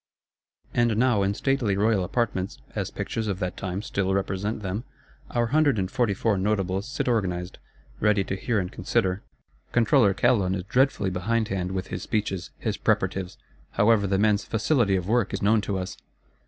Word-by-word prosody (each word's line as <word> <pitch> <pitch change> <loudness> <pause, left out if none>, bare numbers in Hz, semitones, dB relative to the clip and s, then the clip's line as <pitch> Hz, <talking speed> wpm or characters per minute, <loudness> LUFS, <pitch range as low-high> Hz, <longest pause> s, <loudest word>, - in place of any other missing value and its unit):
And 120 -2 +2
now, 120 -3 +3
in 100 +1 +1
stately 125 -6 +1
royal 105 -2 +2
apartments, 100 -2 -1 0.2
as - - -2
Pictures 110 -1 -3
of 100 -3 -1
that 90 -1 -3
time 95 +2 -4
still 95 -3 0
represent 100 +2 -2
them, 100 +4 -3 0.5
our 120 0 +1
hundred 150 -5 +4
and 95 -2 -1
forty 120 -7 +1
four 105 0 +1
Notables 95 0 0
sit 130 - -3
organised; 90 -6 -1 0.4
ready 105 -2 +3
to 95 - -3
hear 110 +4 -1
and 90 -2 -1
consider. 95 +1 0 0.5
Controller 115 -4 +4
Calonne 100 -7 +2
is 90 - -3
dreadfully 115 -2 +1
behindhand 95 -1 -1
with 95 0 -3
his - - -4
speeches, 100 -5 -2
his - - -2
preparatives; 95 -1 0 0.4
however, 105 -1 +4
the 95 0 +1
man's 105 0 +3
"facility 110 -3 +1
of 90 -1 -2
work" 115 -1 +1
is - - -5
known 105 +1 +4
to 100 -1 -2
us. 95 +1 -4
100 Hz, 170 wpm, -26 LUFS, 95-115 Hz, 0.5 s, hundred